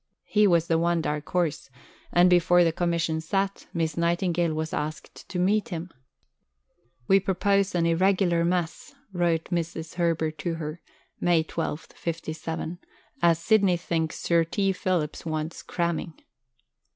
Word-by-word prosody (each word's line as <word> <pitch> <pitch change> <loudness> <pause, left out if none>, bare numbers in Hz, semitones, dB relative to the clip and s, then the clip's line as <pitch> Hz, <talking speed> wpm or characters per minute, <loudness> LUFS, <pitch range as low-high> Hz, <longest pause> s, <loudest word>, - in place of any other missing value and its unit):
He 210 0 +3
was 170 -3 +3
the 165 -1 +2
one 170 0 +2
dark 150 -2 -3
horse; 165 -6 -1 0.4
and, 175 +1 +5
before 175 0 +5
the 165 - +3
Commission 170 -1 0
sat, 195 +4 -2
Miss 160 -3 -1
Nightingale 170 -1 +1
was 155 0 -3
asked 155 +1 -5
to 185 - -4
meet 200 +4 +2
him. 175 0 -5 1.2
"We 195 - +6
propose 195 +1 +1
an 170 -1 +2
irregular 175 0 +2
mess," 175 - -2 0.2
wrote 170 -2 0
Mrs. 165 -2 -3
Herbert 165 -2 0
to 170 -2 -2
her 155 +1 -6 0.4
(May 175 -2 +3
12, 160 -1 -3
'57), 165 0 -4 0.4
"as 170 -1 +5
Sidney 195 0 +3
thinks 165 -2 -2
Sir 170 -1 +3
T. 195 +4 0
Phillips 180 -5 -1
wants 155 0 -3
cramming." 170 -2 -2
170 Hz, 140 wpm, -26 LUFS, 160-180 Hz, 1.2 s, We